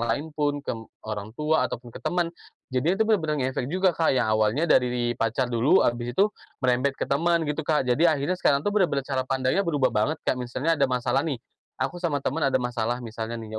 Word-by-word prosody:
lain 120 Hz, +7 st, -2 dB
pun, 145 Hz, -1 st, -1 dB
ke 115 Hz, -1 st, -5 dB, 0.2 s
orang 110 Hz, +1 st, -6 dB
tua 150 Hz, -3 st, +1 dB
ataupun 120 Hz, -1 st, -7 dB
ke -, -, -9 dB
teman. 175 Hz, -1 st, -1 dB, 0.4 s
Jadinya 160 Hz, +9 st, +1 dB
itu 220 Hz, -, +2 dB
benar-benar 165 Hz, -9 st, +1 dB
ngefek 130 Hz, -1 st, -2 dB
juga, 185 Hz, +3 st, +2 dB
Kak. 165 Hz, -1 st, +1 dB
Yang 125 Hz, -, +2 dB
awalnya 110 Hz, +8 st, +2 dB
dari 125 Hz, -5 st, +2 dB
pacar 120 Hz, +2 st, -1 dB
dulu, 130 Hz, +11 st, +4 dB
habis 120 Hz, 0 st, -1 dB
itu 195 Hz, -, +6 dB, 0.4 s
merembet 130 Hz, +2 st, +2 dB
ke -, -, -2 dB
teman, 165 Hz, +4 st, +1 dB
gitu 150 Hz, +1 st, -2 dB
Kak. 150 Hz, -2 st, +1 dB
Jadi, 145 Hz, +8 st, +3 dB
akhirnya 150 Hz, +2 st, +1 dB
sekarang 140 Hz, 0 st, +2 dB
tuh 205 Hz, -, 0 dB
benar-benar 170 Hz, -10 st, +1 dB
cara 135 Hz, -1 st, -1 dB
pandangnya 130 Hz, +7 st, +1 dB
berubah 145 Hz, -, +1 dB
banget, 110 Hz, +8 st, +1 dB
Kak. -, -, +2 dB
Misalnya 140 Hz, +6 st, -1 dB
ada 140 Hz, -, +4 dB
masalah 125 Hz, +1 st, +1 dB
nih, 145 Hz, -5 st, -2 dB, 0.4 s
aku 135 Hz, +7 st, -2 dB
sama 155 Hz, -5 st, 0 dB
teman 155 Hz, +5 st, -1 dB
ada -, -, +2 dB
masalah 120 Hz, -1 st, -1 dB
misalnya 115 Hz, 0 st, -5 dB
nih, 110 Hz, -1 st, -6 dB
135 Hz, 210 wpm, -25 LUFS, 120-160 Hz, 0.4 s, itu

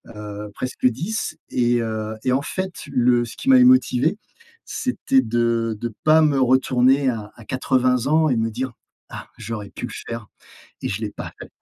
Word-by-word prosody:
heu, 105 Hz, 0 st, -7 dB
presque 130 Hz, 0 st, -4 dB
10 170 Hz, -, -3 dB
et 120 Hz, -1 st, +2 dB
heu, 110 Hz, -1 st, -3 dB
et 130 Hz, -, +1 dB
en 130 Hz, -, +2 dB
fait, 185 Hz, +3 st, -5 dB
le 120 Hz, -2 st, +3 dB
ce 115 Hz, -, -10 dB
qui 270 Hz, -, -2 dB
m'avait 255 Hz, -1 st, +8 dB
motivé, 205 Hz, -, +4 dB, 0.5 s
c'était 190 Hz, -, +1 dB
de 115 Hz, -1 st, 0 dB
de 120 Hz, -1 st, -4 dB
pas 155 Hz, +1 st, +6 dB
me 145 Hz, -3 st, +3 dB
retourner 130 Hz, +1 st, +3 dB
à 110 Hz, -3 st, -4 dB
à 115 Hz, -, -13 dB
80 130 Hz, 0 st, +1 dB
ans 155 Hz, +1 st, +3 dB
et 125 Hz, -, +1 dB
me 115 Hz, 0 st, 0 dB
dire: 130 Hz, +3 st, -3 dB, 0.4 s
«Ah, -, -, -8 dB
j'aurais 105 Hz, -3 st, -6 dB
pu -, -, -6 dB
le -, -, -10 dB, 0.2 s
faire 115 Hz, -2 st, -5 dB, 0.6 s
et -, -, -2 dB
je 100 Hz, +2 st, -3 dB
l'ai 110 Hz, -2 st, -3 dB
pas -, -, -8 dB
fait». -, -, -9 dB
125 Hz, 185 wpm, -22 LUFS, 115-140 Hz, 0.6 s, m'avait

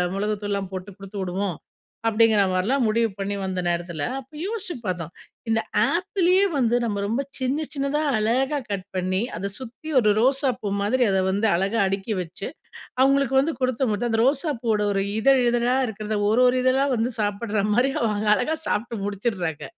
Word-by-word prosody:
மிளகுத்தூள்லாம் 200 Hz, -1 st, -2 dB
போட்டு 185 Hz, +1 st, -5 dB
கொடுத்து 195 Hz, +1 st, -9 dB
விடுவோம், 185 Hz, 0 st, -2 dB, 0.5 s
அப்படிங்கிற 220 Hz, -2 st, +4 dB
மாதிரிலாம் 225 Hz, +9 st, +1 dB
முடிவு 225 Hz, +1 st, +2 dB
பண்ணி 200 Hz, +1 st, -2 dB
வந்த 185 Hz, -1 st, -2 dB
நேரத்தில, 170 Hz, -3 st, -2 dB, 0.2 s
அப்ப 265 Hz, 0 st, -14 dB
யோசுச்சு 410 Hz, -4 st, -4 dB
பார்த்தோம். 175 Hz, -4 st, -3 dB, 0.4 s
இந்த 225 Hz, 0 st, +2 dB, 0.3 s
ஆப்பிளயே 370 Hz, +1 st, +2 dB
வந்து 240 Hz, -3 st, +2 dB
நம்ம 205 Hz, -3 st, -2 dB
ரொம்ப 230 Hz, +6 st, 0 dB, 0.2 s
சின்ன 270 Hz, +4 st, -1 dB
சின்னதாக 285 Hz, +1 st, 0 dB
அழகா 260 Hz, +7 st, +1 dB
கட் 195 Hz, -1 st, -3 dB
பண்ணி, 185 Hz, +1 st, 0 dB, 0.2 s
அத 200 Hz, +3 st, -3 dB
சுத்தி 260 Hz, +5 st, -9 dB
ஒரு 210 Hz, -3 st, +4 dB
ரோசா 265 Hz, +3 st, +3 dB
பூ 205 Hz, -2 st, -2 dB
மாதிரி 250 Hz, +5 st, +2 dB
அதை 190 Hz, 0 st, +2 dB
வந்து 205 Hz, +3 st, +1 dB
அழகா 195 Hz, +6 st, 0 dB
அடுக்கி 195 Hz, +3 st, -2 dB
வச்சு, 180 Hz, +3 st, -6 dB, 0.5 s
அவங்களுக்கு 275 Hz, 0 st, +3 dB
வந்து 320 Hz, +4 st, -1 dB
கொடுத்த 255 Hz, 0 st, +1 dB
மட்டு 215 Hz, +4 st, -1 dB
அந்த 225 Hz, 0 st, +1 dB
ரோசா 290 Hz, +3 st, +1 dB
பூவோட 215 Hz, -3 st, +1 dB
ஒரு 195 Hz, 0 st, +1 dB, 0.2 s
இதழ் 270 Hz, +2 st, +5 dB
இதழா 240 Hz, +1 st, +2 dB
இருக்கிறத, 215 Hz, 0 st, -3 dB
ஒரு 235 Hz, +4 st, +4 dB
ஒரு 250 Hz, +1 st, +2 dB
இதழா 265 Hz, +2 st, +3 dB
வந்து 235 Hz, +3 st, 0 dB
சாப்பிடுற 205 Hz, 0 st, -1 dB
மாதிரி 250 Hz, +4 st, +3 dB
அவங்க 210 Hz, -2 st, 0 dB
அழகா 310 Hz, +6 st, -1 dB
சாப்பிட்டு 220 Hz, -2 st, -2 dB
முடிச்சுடுறாங்க. 200 Hz, -6 st, -2 dB
225 Hz, 165 wpm, -24 LUFS, 200-260 Hz, 0.5 s, இதழ்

